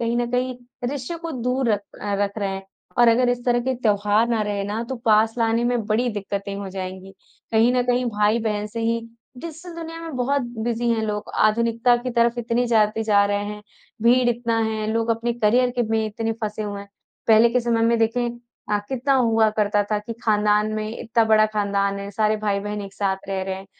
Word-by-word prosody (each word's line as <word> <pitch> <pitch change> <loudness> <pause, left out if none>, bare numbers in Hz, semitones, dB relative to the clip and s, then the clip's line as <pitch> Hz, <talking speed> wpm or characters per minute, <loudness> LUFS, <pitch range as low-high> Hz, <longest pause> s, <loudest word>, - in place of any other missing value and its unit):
कहीं 235 0 0
न 240 0 -1
कहीं 250 +1 0 0.4
रिश्ते 285 +4 -4
को 335 - -4
दूर 250 +1 0
रख 205 - 0 0.2
अ, 205 0 -1
रख 200 +1 -2
रहे 200 -2 -1
हैं, 195 0 -5 0.4
और 240 -1 +7
अगर 245 +2 +4
इस 245 0 -1
तरह 240 -1 +2
के 260 +2 -1
त्योहार 210 -1 +2
ना 230 -2 +1
रहे 205 -1 -2
ना 210 +3 -3
तो 265 - -3
पास 220 0 +4
लाने 230 +1 +2
में 240 -2 0
बड़ी 225 +4 +1
दिक्कतें 200 -1 -4
हो 200 -1 -5
जाएँगी। 190 0 -7 0.4
कहीं 225 +2 +4
न 250 0 +2
कहीं 250 0 +2
भाई-बहन 210 0 0
से 225 +2 -6
ही 230 +1 0 0.4
डिजिटल 335 +4 -8
दुनिया 330 0 -7
में 325 -4 -6
बहुत 275 +3 +1 0.2
बिज़ी 240 0 -1
हैं 225 -1 +1
लोग। 210 -1 -3
आधुनिकता 230 +2 +3
की 245 +1 -4
तरफ 235 0 +3
इतने 240 +1 0
जाते 220 -1 +2
जा 205 -2 +4
रहे 205 0 -1
हैं, 210 0 -6 0.4
भीड़ 245 +1 +4
इतना 235 -1 0
है, 220 -1 -2
लोग 230 0 0
अपने 230 +1 0
करियर 240 +2 +2
के - - +4
में 220 0 +1
इतने 225 +1 -2
फँसे 215 0 -3
हुए 205 -1 -5
हैं। 200 - -12 0.4
पहले 225 +1 +6
के 250 +1 +2
समय 230 -1 +1
में 230 0 +3
देखें 230 +2 +1 0.4
अ, 210 - +2
कितना 270 +1 +1
हुआ 225 -4 +3
करता 210 -1 +1
था 210 - +2
कि 210 +3 -7
खानदान 210 0 +2
में 215 0 -3
इतना 230 0 +1
बड़ा 215 -1 +5
खानदान 200 -2 -1
है, 200 0 -6
सारे 215 +1 +1
भाई-बहन 205 0 -2
एक 195 -1 -9
साथ 195 -1 0
रह 190 -1 -2
रहे 190 0 -3
हैं, 190 +1 -9
225 Hz, 215 wpm, -23 LUFS, 210-240 Hz, 0.4 s, और